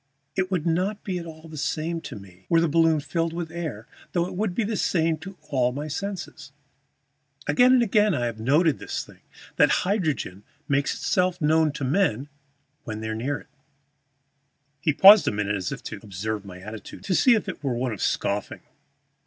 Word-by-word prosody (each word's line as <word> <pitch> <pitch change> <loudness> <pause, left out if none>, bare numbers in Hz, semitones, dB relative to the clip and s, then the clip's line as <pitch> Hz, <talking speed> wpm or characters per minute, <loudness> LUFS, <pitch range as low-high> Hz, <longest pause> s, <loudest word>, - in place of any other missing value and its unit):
It 185 -1 0
would 180 -4 -1
not 185 +5 0
be 185 -3 -3
at 170 - -8
all 160 0 -11
the 155 -1 -9
same 165 +4 -2
to 135 - -8
me 95 -2 -14
were 165 - +5
the 170 - +3
balloon 160 0 +3
filled 165 +3 -2
with 170 -1 -4
air, 155 -10 -5 0.3
though 175 -1 +2
it - - -6
would 195 -2 -1
be 235 - +1
the 215 +2 -2
same 165 -4 +1
to 195 +3 -10
all 125 -3 +2
my 145 +3 -4
senses. 175 -3 -5 0.9
Again 245 +13 +5
and 250 -2 +5
again 210 -3 +3
I 120 -3 0
have 115 -2 -4
noted 145 +6 +3
this - - -4
thing, - - -17 0.4
that - - +6 0.2
hydrogen 160 - -1 0.3
makes 140 -2 +1
itself 180 -1 0
known 155 0 +3
to 145 - -5
men 140 - +1 0.5
when 110 -3 -5
they 110 - -4
are - - -2
near 135 +5 -2
it." - - -15 1.3
He 155 - +2
paused 195 +7 +8
a - - +3
moment 105 0 -1
as 95 -3 -3
if - - -6
to - - -6
observe 105 +1 -4
my 90 -2 -9
attitude, 105 +3 -9
to 190 - -1
see 240 +6 +5
if 215 - -2
it 185 - -6
were 130 -4 0
one 125 +1 -1
of 105 - -7
scoffing. 100 +1 -1
160 Hz, 200 wpm, -25 LUFS, 120-180 Hz, 1.3 s, paused